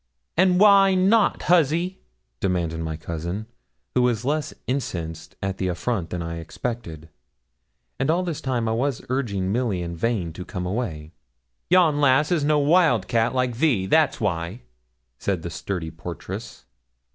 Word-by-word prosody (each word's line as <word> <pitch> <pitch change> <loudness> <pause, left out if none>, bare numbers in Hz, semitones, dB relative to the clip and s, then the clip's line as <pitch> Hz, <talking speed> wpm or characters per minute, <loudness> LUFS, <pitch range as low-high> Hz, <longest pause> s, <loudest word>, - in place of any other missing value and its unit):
'And 180 +1 +4
why 195 -2 +6
not, 200 +4 +3
huzzy?' 170 +2 +2 0.4
demanded 85 -4 -1
my 80 -1 -3
cousin, 85 +6 -4 0.5
who 125 - +3
was 120 -1 +1
less 150 +2 0
incensed 85 - -4
at 95 0 -2
the 95 - 0
affront 90 0 -2
than 90 -1 -3
I 85 0 -5
expected. 85 -3 -5 1.0
All 175 +3 +2
this 170 -5 -4
time 125 -4 -1
I - - +1
was 125 +3 -1
urging 100 -8 -1
Milly 110 -6 0
in 85 0 -5
vain 90 -3 -1
to 90 - -7
come 90 0 -5
away. 90 -7 -3 0.6
'Yon 165 -5 +4
lass 145 +3 +4
is 165 -4 +2
no 150 +1 +3
wild 145 - +3
cat, 115 +1 +1
like 125 -2 0
thee 125 -10 +2
that's 155 +9 +3
why,' 95 +2 -2 0.6
said 95 -5 -1
the 85 - -5
sturdy 85 -1 -4
portress. 85 0 -8
115 Hz, 150 wpm, -24 LUFS, -, 1.0 s, why